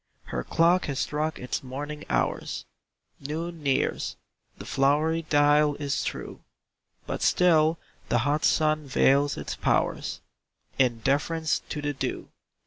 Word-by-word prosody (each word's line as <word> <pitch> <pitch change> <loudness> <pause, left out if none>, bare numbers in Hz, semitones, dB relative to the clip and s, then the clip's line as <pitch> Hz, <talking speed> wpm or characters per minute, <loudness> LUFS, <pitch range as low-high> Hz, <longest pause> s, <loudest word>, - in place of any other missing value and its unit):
Her 60 - -4
clock 170 - +3
has 140 -2 -3
struck 155 +3 -1
its 125 - -3
morning 145 +3 -6
hours; - - -1 0.5
Noon 160 +4 -5
nears 140 -2 0 0.4
the - - -9
flowery 150 +4 +2
dial 145 0 +4
is 140 -2 -2
true; - - -5 0.7
But - - -4
still 165 -2 +4 0.3
the 120 - +3
hot 150 +1 +1
sun 155 -1 +2
veils 140 +2 +3
its - - -4
powers, - - 0 0.6
In 120 -3 +2
deference 155 +5 +1
to 150 - -4
the 145 0 -1
dew. 135 - -4
150 Hz, 130 wpm, -27 LUFS, 140-155 Hz, 0.7 s, dial